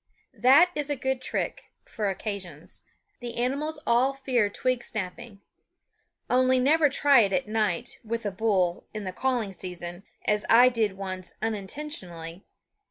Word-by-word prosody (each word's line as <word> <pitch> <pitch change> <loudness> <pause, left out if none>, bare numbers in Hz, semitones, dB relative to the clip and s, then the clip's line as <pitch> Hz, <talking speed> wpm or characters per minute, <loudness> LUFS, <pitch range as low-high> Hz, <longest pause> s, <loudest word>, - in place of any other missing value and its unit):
That 285 +8 +6
is 295 -3 0
a 290 - +1
good 265 0 -2
trick, - - -3 0.2
for 210 -2 -2
occasions. 190 -6 -6 0.4
The 240 -1 -6
animals 280 +6 -1
all 250 +3 +3
fear 255 -6 +1
twig 255 +4 -1
snapping. 200 +1 -6 0.9
Only 255 +1 +3
never 295 +4 +4
try 280 -1 +5
it 200 -4 +3
at 270 - 0
night, 215 0 -1
with 230 0 -4
a 205 - -1
bull, 185 -4 0
in 215 - -4
the 185 -1 -5
calling 245 -4 -1
season, 175 -1 -5 0.2
as 210 0 +2
I 245 +2 +7
did 220 -5 -1
once 185 -2 -6
unintentionally. 190 - -5
225 Hz, 145 wpm, -27 LUFS, 195-260 Hz, 0.9 s, I